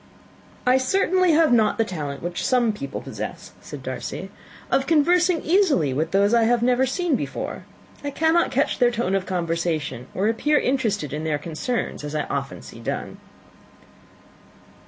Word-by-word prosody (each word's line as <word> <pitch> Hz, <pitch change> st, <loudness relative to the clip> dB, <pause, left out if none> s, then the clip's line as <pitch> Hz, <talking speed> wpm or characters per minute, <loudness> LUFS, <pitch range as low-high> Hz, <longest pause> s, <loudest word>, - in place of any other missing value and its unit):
"I 255 Hz, +1 st, +5 dB
certainly 370 Hz, +5 st, +2 dB
have 310 Hz, -4 st, +4 dB
not 220 Hz, -3 st, +3 dB
the 225 Hz, -, +2 dB
talent 150 Hz, -7 st, -5 dB
which 175 Hz, 0 st, -3 dB
some 245 Hz, -4 st, +2 dB
people 140 Hz, -8 st, -6 dB
possess," -, -, -7 dB
said -, -, -9 dB
Darcy, -, -, -5 dB, 0.4 s
"of 270 Hz, 0 st, +2 dB
conversing 345 Hz, +2 st, +3 dB
easily 315 Hz, -, +3 dB
with 155 Hz, +5 st, -1 dB
those 200 Hz, +4 st, +3 dB
I 230 Hz, -1 st, +4 dB
have 240 Hz, 0 st, +2 dB
never 250 Hz, +1 st, +3 dB
seen 335 Hz, +3 st, 0 dB
before. -, -, -5 dB, 0.4 s
I 285 Hz, -, -2 dB
cannot 320 Hz, +4 st, +2 dB
catch 275 Hz, +3 st, 0 dB
their 245 Hz, -2 st, +5 dB
tone 235 Hz, -5 st, -1 dB
of 195 Hz, -1 st, 0 dB
conversation, 165 Hz, -7 st, -2 dB
or 195 Hz, +3 st, +1 dB
appear 295 Hz, +7 st, +2 dB
interested 220 Hz, -, -1 dB
in 150 Hz, +1 st, -3 dB
their 155 Hz, -2 st, 0 dB
concerns, 165 Hz, -, -3 dB
as 150 Hz, +1 st, -5 dB
I 150 Hz, -, 0 dB
often 140 Hz, -1 st, -4 dB
see 115 Hz, -, -11 dB
done." 115 Hz, -, -4 dB
230 Hz, 160 wpm, -23 LUFS, -, 0.4 s, I